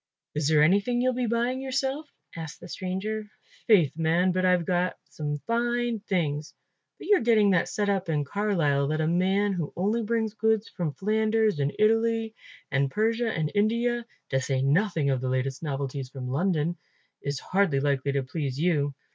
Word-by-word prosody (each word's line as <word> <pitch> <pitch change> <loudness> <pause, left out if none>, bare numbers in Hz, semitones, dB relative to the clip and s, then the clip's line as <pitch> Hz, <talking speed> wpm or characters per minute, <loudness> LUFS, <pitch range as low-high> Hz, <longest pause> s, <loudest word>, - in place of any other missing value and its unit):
"Is 150 -1 0
there 150 -1 +5
anything 200 +9 +3
you'll 255 +1 +2
be 245 -1 -1
buying 240 +3 0
yourself?" 270 +3 -2 0.3
asked 160 -1 -7
the - - -10
stranger. 200 +4 -4 0.4
"Faith, 175 -11 +4
man, 165 +3 +2
but 185 +1 0
I've 180 -2 +3 0.4
some 150 -1 -4
fine 240 0 0
things, 155 -7 -2 0.4
but - - -10
you're 410 -2 +4
getting 220 -4 +4
that 180 - +2
set 205 -1 -1
up 190 -3 0
in 150 -2 +1
Carlisle 150 -6 +1
that 155 +2 -1
a 155 - +1
man 190 +4 +2
who 165 -5 -3
only 210 +6 0
brings 220 -1 -1
goods 220 0 +1
from 165 -6 -3
Flanders 215 -2 +1
and 140 0 +1
Italy 225 +1 +2 0.4
and 135 0 +1
Persia 225 - 0
and 155 -5 -2
India, 235 +3 +1 0.3
to 135 - +1
say 130 0 -1
nothing 155 -1 +2
of 130 -2 0
the 130 - -2
latest 130 +1 -1
novelties 140 -3 -3
from 130 -1 -7
London, 165 +3 0 0.4
is 140 -2 -3
hardly 185 -7 +1
likely 140 -1 0
to 140 -1 0
please 140 0 -4
you. 150 -5 +1
185 Hz, 170 wpm, -27 LUFS, 145-220 Hz, 0.4 s, there